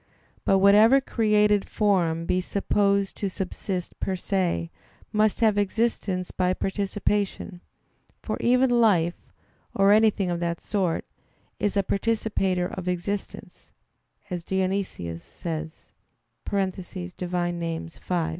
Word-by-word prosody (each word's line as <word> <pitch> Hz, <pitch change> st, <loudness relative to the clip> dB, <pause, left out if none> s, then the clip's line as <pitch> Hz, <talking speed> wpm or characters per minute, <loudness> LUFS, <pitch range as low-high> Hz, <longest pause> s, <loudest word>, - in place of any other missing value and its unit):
But 195 Hz, -, +4 dB
whatever 210 Hz, +7 st, +6 dB
created 210 Hz, -5 st, +2 dB
form 175 Hz, -6 st, +1 dB
be 185 Hz, +2 st, +1 dB
supposed 200 Hz, +1 st, +1 dB
to 200 Hz, -, -2 dB
subsist 185 Hz, -1 st, -4 dB
"per 190 Hz, -, -1 dB
se," 180 Hz, -, -1 dB, 0.4 s
must 215 Hz, +1 st, +2 dB
have 215 Hz, -2 st, +4 dB
existence 200 Hz, -3 st, -1 dB
by 185 Hz, 0 st, 0 dB
participation; 200 Hz, -1 st, -2 dB, 0.6 s
for -, -, -3 dB
"even 250 Hz, +1 st, +3 dB
life," 200 Hz, -8 st, +2 dB, 0.4 s
or 195 Hz, 0 st, +5 dB
anything 210 Hz, -3 st, +3 dB
of 170 Hz, -, -2 dB
that 170 Hz, -1 st, -2 dB
sort, 185 Hz, -5 st, -1 dB, 0.5 s
"is 205 Hz, -1 st, 0 dB
a 200 Hz, -, +3 dB
participator 195 Hz, -3 st, 0 dB
of 180 Hz, 0 st, -6 dB
existence," 180 Hz, +3 st, -4 dB, 0.6 s
as 175 Hz, -2 st, -3 dB
Dionysius 185 Hz, -, -2 dB
says 160 Hz, -1 st, -7 dB, 0.5 s
(Div. 185 Hz, -2 st, -3 dB
Nom. 170 Hz, -2 st, -2 dB
v). 165 Hz, -, -16 dB
195 Hz, 110 wpm, -25 LUFS, 175-205 Hz, 0.6 s, whatever